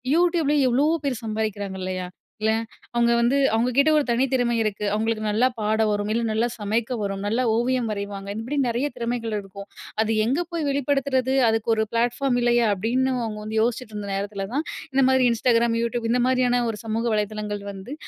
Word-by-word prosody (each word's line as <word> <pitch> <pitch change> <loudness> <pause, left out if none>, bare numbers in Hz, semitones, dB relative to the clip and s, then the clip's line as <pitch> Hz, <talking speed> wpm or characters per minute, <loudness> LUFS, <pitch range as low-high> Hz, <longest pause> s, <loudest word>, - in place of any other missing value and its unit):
YouTubeல 335 -4 +2
எவ்வளோ 275 +5 +3 0.2
பேர் 250 -4 -2
சம்பாதிக்கிறாங்க 205 -3 -3
இல்லயா? 185 -1 -3 0.3
இல்ல! 220 0 +2 0.4
அவுங்க 235 0 +3
வந்து 240 +4 +3 0.2
அவுங்க 235 +3 +2
கிட்ட 280 +3 +5
ஒரு 295 - +2
தனி 235 +3 +2
திறமை 245 -2 +1
இருக்கு. 210 -1 -2
அவுங்களுக்கு 220 0 -1
நல்லா 220 +5 +3
பாட 215 +1 +1
வரும். 205 0 -1
இல்ல 235 0 0
நல்லா 225 +2 +1
சமைக்க 220 +4 -1
வரும். 195 -1 -3
நல்லா 230 +5 +1
ஓவியம் 245 0 +1
வரைவாங்க. 200 -1 -5
இப்படி 250 +6 -4
நெறைய 240 +5 0
திறமைகள் 235 -2 -2
இருக்கும். 200 0 -10 0.3
அது 220 0 0
எங்கே 280 +9 +1
போய் 335 -2 -2
வெளிப்படுத்துறது? 275 -2 0 0.2
அதுக்கு 225 0 -1
ஒரு 220 - +1
ப்ளாட்ஃபார்ம் 245 +2 +1
இல்லயா 240 -1 +3
அப்டின்னு 245 +7 0
அவுங்க 210 -1 -4
வந்து 220 +1 -4
யோசிச்சிட்டு 230 -1 -1
இருந்த 205 -1 -5
நேரத்தில 200 0 -3
தான், 300 +4 -1 0.3
இந்த 270 0 +4
மாதிரி 260 -1 +4
Instagram, 230 0 +2
YouTube 235 0 -2
இந்த 245 0 +2
மாதிரியான 250 -1 +2
ஒரு 210 - -8
சமூக 225 +2 -1
வலதளங்கள் 210 -1 -3
வந்து, 195 +8 -8
230 Hz, 180 wpm, -24 LUFS, 210-255 Hz, 0.4 s, கிட்ட